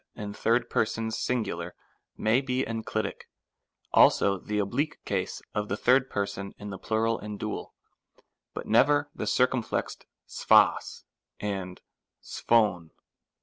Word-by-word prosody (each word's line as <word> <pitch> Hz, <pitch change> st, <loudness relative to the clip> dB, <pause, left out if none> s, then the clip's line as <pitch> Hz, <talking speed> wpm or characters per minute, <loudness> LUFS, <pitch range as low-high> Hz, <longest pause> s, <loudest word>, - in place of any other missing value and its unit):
67 105 Hz, +3 st, 0 dB
persons 115 Hz, 0 st, -1 dB
singular 120 Hz, -5 st, -2 dB, 0.4 s
may 110 Hz, +4 st, +2 dB
be 130 Hz, -1 st, -1 dB
enclitic, 110 Hz, -2 st, -4 dB, 0.7 s
also 100 Hz, -1 st, +5 dB
the 105 Hz, +3 st, -4 dB
oblique 140 Hz, +10 st, -1 dB
case -, -, -3 dB
of 105 Hz, 0 st, -2 dB
the 100 Hz, -, -1 dB
third 130 Hz, +3 st, +3 dB
person 100 Hz, -2 st, -4 dB
in 105 Hz, 0 st, -7 dB
the 95 Hz, -, -7 dB
plural 115 Hz, +1 st, 0 dB
and 105 Hz, -1 st, -7 dB
dual, 110 Hz, 0 st, -5 dB, 0.8 s
but -, -, -5 dB
never 145 Hz, +5 st, +3 dB
the -, -, -4 dB
circumflexed 125 Hz, -2 st, 0 dB, 0.2 s
ccpdq -, -, +3 dB, 0.4 s
and 95 Hz, -3 st, -4 dB, 0.4 s
6(pC}v. 105 Hz, -8 st, +1 dB
110 Hz, 115 wpm, -28 LUFS, 100-125 Hz, 0.8 s, also